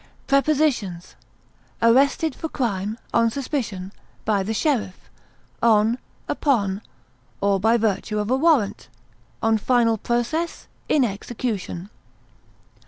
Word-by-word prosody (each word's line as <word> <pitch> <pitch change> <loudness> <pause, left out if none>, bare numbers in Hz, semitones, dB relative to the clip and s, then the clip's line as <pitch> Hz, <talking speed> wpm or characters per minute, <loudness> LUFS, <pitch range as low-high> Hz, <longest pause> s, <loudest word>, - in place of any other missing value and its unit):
Prepositions: 275 - +1 0.7
Arrested 270 +6 +3
for 320 - -5
crime, 215 -5 -2 0.2
on 230 0 +4
suspicion, 225 -8 -3 0.3
by 205 -3 +2
the 195 +3 -2
sheriff; 220 -5 -1 0.5
on, 225 +1 +4 0.3
upon, 205 -8 +1 0.6
or 200 -1 +2
by 225 +4 +4
virtue 215 -1 -1
of 210 +2 -1
a - - +4
warrant; 270 - +2 0.6
on 225 -1 +3
final 230 -1 +2
process; 240 +10 -1 0.2
in 290 - +4
execution. 205 -3 -4
230 Hz, 100 wpm, -23 LUFS, 205-265 Hz, 0.7 s, on